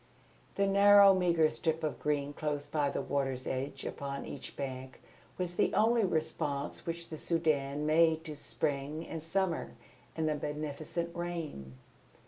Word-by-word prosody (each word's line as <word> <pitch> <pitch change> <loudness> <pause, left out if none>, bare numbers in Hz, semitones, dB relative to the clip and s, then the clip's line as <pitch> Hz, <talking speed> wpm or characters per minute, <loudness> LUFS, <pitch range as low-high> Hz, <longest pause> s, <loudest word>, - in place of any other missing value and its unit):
The 200 - +2
narrow 200 0 +7
meagre 170 -4 +3
strip 160 -1 -1
of 155 - -2
green 145 -1 -1
close 145 -1 -2
by 145 -1 0
the - - -2
water's 135 -2 -1
edge 135 +2 -3
upon 140 0 -4
each - - -8
bank 130 -1 -6 0.4
was 180 -1 -2
the - - +2
only 230 +1 +4
response 155 -4 -2
which 170 0 -4
the 155 - -6
Soudan 150 -4 0
made 160 +1 +4
to 155 -2 -6
Spring 145 +1 -3
and 165 - -5
Summer 175 +1 -1 0.4
and 160 -1 0
the 155 - +2
beneficent 150 +3 -4
rain. 165 - -5
155 Hz, 145 wpm, -32 LUFS, 145-170 Hz, 0.4 s, narrow